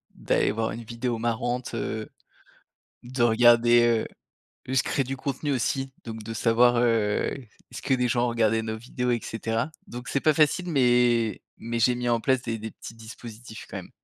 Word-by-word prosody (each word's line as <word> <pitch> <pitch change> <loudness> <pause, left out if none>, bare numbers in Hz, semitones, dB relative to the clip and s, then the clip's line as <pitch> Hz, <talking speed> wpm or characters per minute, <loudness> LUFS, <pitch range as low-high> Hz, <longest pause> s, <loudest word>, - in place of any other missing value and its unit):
d'aller - - +1
voir 110 +1 -2
une 115 +1 -6
vidéo 115 +1 -3
marrante, 120 +2 -2
heu, 110 -1 -4 0.9
de 125 0 -1
regarder, 120 0 +5
heu, - - -6 0.6
juste 130 -1 +2
créer 135 - 0
du 135 +2 -4
contenu 140 +2 -3
aussi 135 +1 -1
donc 115 -1 -7
de 115 - -6
savoir, 120 +2 +4
heu, 115 -3 +2 0.4
est-ce - - -8
que 135 - +2
des 125 -1 +1
gens 120 0 +1
ont - - +1
regardé 115 -1 +1
nos 110 0 -4
vidéos 125 +1 -3
et 120 - 0
cetera. 115 +4 -2 0.2
Donc 120 +1 -8
c'est 140 - 0
pas 155 +1 +3
facile 160 +4 +2
mais 120 -4 +3 0.2
mais 115 +1 -4
j'ai 125 +2 +3
mis 120 0 -2
en 115 -1 +2
place 130 0 +1
des 115 -2 -3
des 110 +1 -6
petits 115 - -10
dispositifs, 115 0 -10
quand - - -6
même. - - -8
120 Hz, 190 wpm, -26 LUFS, 115-125 Hz, 0.9 s, regarder